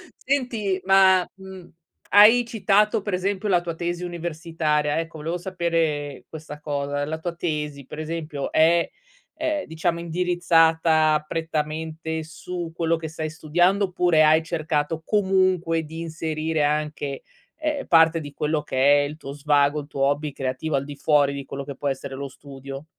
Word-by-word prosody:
Senti 230 -8 -1
ma, 190 -1 +5
mhmm, 190 -2 -11 0.4
hai 225 +4 +8
citato 210 -1 +2
per 205 -2 -4
esempio 195 +2 -1
la 175 -2 +3
tua 170 -2 -5
tesi 175 +1 -3
universitaria, 160 -3 -1
ecco 165 -1 -6
volevo 165 +4 -3
sapere 165 -6 -2
questa 150 -2 -9
cosa: 145 -1 -2
la 160 +1 -4
tua 170 +1 -4
tesi 150 -5 -3
per 150 - -9
esempio 155 -3 -4
è 165 +2 +4 0.4
è 315 -1 -2
diciamo 165 +1 -2
indirizzata 165 -3 +2
prettamente 160 0 -3
su 170 +1 -6
quello 165 0 +1
che 160 -1 -5
stai 155 -1 -4
studiando, 175 +6 +2
oppure 175 -4 +3
hai 155 +1 +5
cercato 160 -1 -2
comunque 185 -5 +1
di 160 +2 -8
inserire 160 -1 -2
anche, 150 -2 -2 0.3
ehm, 305 -2 -3
parte 165 0 +5
di 145 -1 -9
quello 150 +1 -1
che 140 +2 +3
è - - +1
il 150 +1 -8
tuo 140 -3 -8
svago, 145 0 +2
il 145 - -12
tuo 135 -2 -2
hobby 145 +1 0
creativo 135 +3 -3
al 135 0 -1
di 145 0 -8
fuori 145 -1 +2
di 140 0 -5
quello 140 0 -6
che 140 -2 -7
può 145 - -4
essere 135 0 -3
lo 140 +1 -5
studio? 135 +1 -10
160 Hz, 160 wpm, -24 LUFS, 150-175 Hz, 0.4 s, hai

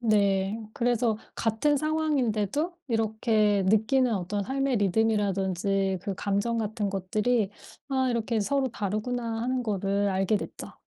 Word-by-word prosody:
네. 200 -2 +2 0.2
그래서 235 -2 +1 0.2
같은 230 +7 +1
상황인데도 300 - 0
이렇게 220 -2 +2
느끼는 225 +4 +3
어떤 200 +1 -2
삶의 270 +2 0
리듬이라든지 195 -2 +1
그 200 0 -3
감정 200 +5 0
같은 215 -1 -2
것들이 205 +3 0 0.4
'아 265 -2 +1
이렇게 230 -1 0
서로 275 +5 +1
다르구나.' 225 +2 -3
하는 255 +1 -1
거를 200 -1 0
알게 190 +2 +1
됐죠. - - -8
220 Hz, 290 characters per minute, -27 LUFS, 200-245 Hz, 0.4 s, 느끼는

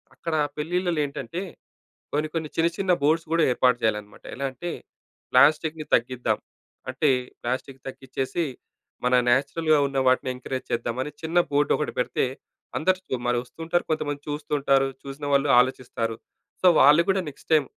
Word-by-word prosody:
అక్కడ 165 -2 -3 0.2
పెళ్ళిళ్ళలో 175 +1 -1
ఏంటంటే 140 +5 -5 0.7
కొన్ని, 150 +2 0
కొన్ని 160 -2 -2
చిన్న, 165 +1 +3
చిన్న 190 -2 +2
బోర్డ్స్ 160 +3 +2
కూడా 165 -1 +3
ఏర్పాటు 125 0 +3
చేయాలన్నమాట. 105 -2 -2
ఎలా 140 +2 -2
అంటే 170 +7 -6 0.6
ప్లాస్టిక్‌ని 155 +3 +4
తగ్గిద్దాం. 125 +1 +1 0.5
అంటే 145 +4 +1 0.3
ప్లాస్టిక్ 130 +2 -4
తగ్గిచ్చేసి 135 +5 -3 0.6
మన 125 - +3 0.2
నేచురల్‌గా 155 +4 +2
ఉన్న 135 0 -3
వాటిని 130 0 +2
ఎంకరేజ్ 130 +1 -5
చేద్దామని 120 +4 -2
చిన్న 165 +2 +1
బోర్డ్ 145 0 +2
ఒకటి 150 - -2
పెడితే, 125 - +1 0.5
అందరు 185 -6 0
మరి 120 - +2
వస్తుంటారు. 165 +7 -2
కొంతమంది 145 -2 -2
చూస్తుంటారు. 145 -2 +1 0.2
చూసిన 140 +1 -7
వాళ్ళు 140 +1 +3
ఆలోచిస్తారు. 120 -3 -2 0.5
సో, - - +4
వాళ్ళు 150 +4 +7
కూడా 190 -1 +1
నెక్స్ట్ 140 - -20
టైమ్ 145 -4 +3
145 Hz, 140 wpm, -25 LUFS, 130-160 Hz, 0.7 s, వాళ్ళు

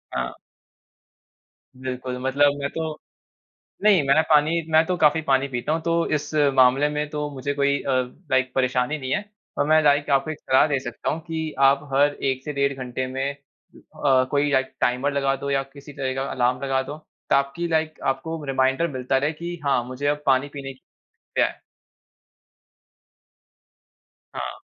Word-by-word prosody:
हाँ। 60 -1 -2 1.5
बिल्कुल। 130 -1 -5
मतलब 140 +2 +3
मैं 140 0 -2
तो 160 -1 -4 0.8
नहीं, 205 -5 +6
मैं 140 +3 +5
पानी 155 +2 +4
मैं 160 +1 +5
तो 180 - 0
काफ़ी 155 0 +4
पानी 135 0 +3
पीता 125 +1 -3
हूँ। 160 - -1
तो, 170 0 +1
इस 150 0 -2 0.2
मामले 130 +2 +4
में 150 0 -2
तो 150 -1 -3
मुझे 140 +1 -3
कोई 140 0 +1
अ, 140 - -2 0.4
लाइक 130 -1 +2
परेशानी 130 +2 +1
नहीं 130 -3 -5
है। 210 - 0 0.3
और - - +2
मैं 155 0 +5
लाइक 145 0 +3
आपको 140 +3 +2
एक 155 - -8
सलाह 130 +3 +3
दे 140 -3 0
सकता 120 -2 -5
हूँ, 155 - -2
कि 160 -2 -4
आप 140 +1 +4
हर 145 +1 +4
1 130 -1 -1
से 150 - -4
डेढ़ 140 0 +1
घंटे 130 0 -4
में 135 +2 -2
अ, 140 -1 -2
कोई 145 0 +2
लाइक 130 -1 +1
टाइमर 125 +4 +1
लगा 135 -1 +1
दो 140 +1 -5
या 135 0 +1
किसी 140 +1 -13
तरह 135 -2 -2
का 135 - -1
अलार्म 125 +1 0
लगा 135 -1 +1
दो 145 +3 -7 0.3
ताकि 140 +5 +1
लाइक 160 -1 -1
आपको 155 +4 -6
रिमाइंडर 135 +4 +1
मिलता 130 0 0
रहे 145 +3 +1
कि 170 +3 -6
हाँ, 135 -3 +2
मुझे 130 +3 -4
अब 145 0 0
पानी 135 +1 +3
पीने 135 -1 -6
की 130 - -30 0.4
है। - - +3 2.9
हाँ। - - -5
140 Hz, 170 wpm, -23 LUFS, 130-150 Hz, 2.9 s, नहीं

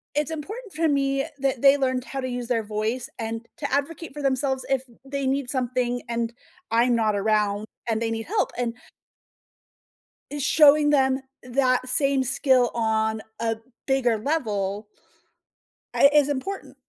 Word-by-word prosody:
it's 300 +2 0
important 405 - -7
for 325 +1 +1
me 275 -2 +1
that 270 -2 0
they 275 0 +7
learned 260 -2 0
how 270 0 -4
to 255 - -3
use 245 -1 -4
their 230 -2 0
voice 215 +4 -2
and 225 0 -4
to 285 - -3
advocate 295 +2 -2
for 295 - -6
themselves 265 -1 0
if 270 -1 +2 0.2
they 275 0 -3
need 270 -1 -1
something 250 -1 -1
and 235 0 -2 0.4
I'm 235 +1 +3
not 220 -2 +1
around 210 0 +1 0.2
and 225 0 0
they 225 -1 -1
need 225 0 -3
help, 420 +2 0
and 240 -1 -1 1.6
eh, 290 - -4
showing 295 +1 +5
them 265 -2 +3 0.2
that 255 0 +1
same 275 +1 +2
skill 260 -1 +2
on 220 -1 0 0.2
a 225 -1 -1 0.3
bigger 255 -4 +2
level 210 -6 -2 1.1
I 280 - +6
is 295 -1 +4
important. 345 +8 -4
255 Hz, 155 wpm, -25 LUFS, 230-280 Hz, 1.6 s, they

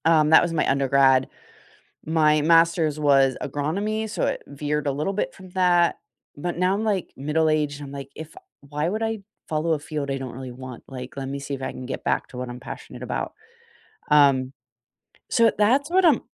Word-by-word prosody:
Um, 155 -2 +4
that 160 - +8
was 170 - -1
my 155 - +1
undergrad. 135 -1 +3 0.8
My 155 -1 +3
master's 165 -1 +3
was 135 -3 +4
agronomy, 200 +11 -2
so - - -2
it - - -1
veered 150 +1 -3
a - - +2
little 150 +8 -2
bit 210 - -2
from 185 -1 -13
that. 180 -2 +3 0.4
But 175 +4 -4
now 180 +2 +2
I'm, 205 +2 -1
like, 200 -4 -1
middle 150 +4 0
aged 150 -2 0
and 145 - -7
I'm, - - -10
like, 140 -1 -7
if 160 0 -9 0.3
why 150 +3 -2
would 215 +4 -2
I 225 -1 -1 0.3
follow 160 +1 0
a 155 - -1
field 145 -1 -4
I 135 - -1
don't 130 -2 -6
really 130 0 -7
want? 130 -1 -9
Like, 130 -1 -8
let 135 -1 -4
me 140 +1 -4
see 140 0 -6
if 135 - -5
I 130 - -3
can 130 - -8
get 130 - -5
back - - 0
to 125 - -10
what 125 0 -4
I'm 120 0 -7
passionate 130 - -9
about. - - -3 0.8
Um. 140 -3 +4 0.8
So 230 -1 +4
that's 260 +8 +3
what 375 +2 +3
I'm 325 - +5
150 Hz, 205 wpm, -24 LUFS, 135-175 Hz, 0.8 s, that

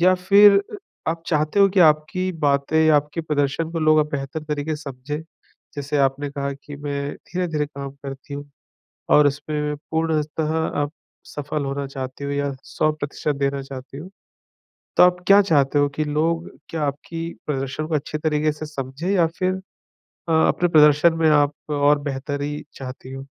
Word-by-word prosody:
या 185 +2 +5
फिर 200 +2 +6
अ, - - -8 0.4
आप 165 0 -5
चाहते 155 +4 +1
हो 200 - +7
कि 190 0 +2
आपकी 155 +3 +3
बातें, 145 +3 +3
आपके 150 +2 +2
प्रदर्शन 150 0 -1
को 165 - -3
लोग 155 -1 +4
अब 150 0 +2
बेहतर 140 +2 -4
तरीके 150 0 -2
से 150 - -11
समझें? 140 +4 -6 0.5
जैसे 145 0 -3
आपने 140 +1 +1
कहा 140 0 -3
कि, 140 +1 -10
"मैं 140 0 -3
धीरे-धीरे 165 -4 -3
काम 140 -1 -7
करती 135 +1 -7
हूँ।" 145 0 -7 0.6
और 150 -1 +7
इसपे 145 +2 -3
में 150 0 -2 0.2
पूर्णतः 160 -1 0 0.3
आप 145 0 -2 0.3
सफल 145 0 -4
होना 140 +1 -3
चाहती 130 0 -6
हो 140 - -3
या 140 0 -1
100% 150 -1 -2
देना 140 0 -1
चाहती 135 0 -9
हो, 165 +6 -8 0.9
तो - - +7
आप 180 0 +6
क्या 200 +1 +8
चाहते 145 -6 +2
हो 145 0 +3
कि 155 - 0
लोग 160 +3 0 0.2
क्या 160 -2 -3
आपकी 165 +4 -4 0.2
प्रदर्शन 135 +1 -2
को 160 - -3
अच्छे 155 +1 -2
तरीके 155 0 +1
से 155 +1 -7
समझें 140 +3 -5
या 180 -4 +4
फिर 185 0 +1 0.7
अ, - - +1
अपने 160 +2 +3
प्रदर्शन 150 0 +6
में 165 -1 +2
आप 145 -1 +4 0.2
और 145 0 +3
बेहतरी 145 +2 -4
चाहती 130 0 -8
हो? 135 0 -7
150 Hz, 170 wpm, -22 LUFS, 140-160 Hz, 0.9 s, क्या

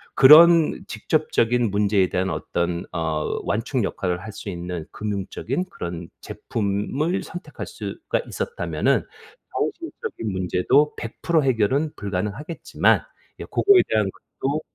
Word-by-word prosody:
그런 165 +3 +7
직접적인 120 -2 +1
문제에 100 -2 +2
대한 95 +1 -1
어떤 85 0 -2
어 80 -2 -2
완충 115 +3 -1
역할을 90 -2 -2
할 110 - -7
수 100 - -8
있는 85 -2 -5
금융적인 105 - -3
그런 85 - -6
제품을 115 - -2
선택할 180 - -8
수가 - - -4
있었다면은 475 - -1 0.5
정신적인 335 - -3
문제도 95 +11 +2
100% 150 +7 0
해결은 130 +5 +1
불가능하겠지만 105 - 0 0.4
예 - - -5
고거에 400 -2 +5
대한 105 -3 +1 0.3
것도 145 +3 0
110 Hz, 275 characters per minute, -23 LUFS, 95-150 Hz, 0.5 s, 그런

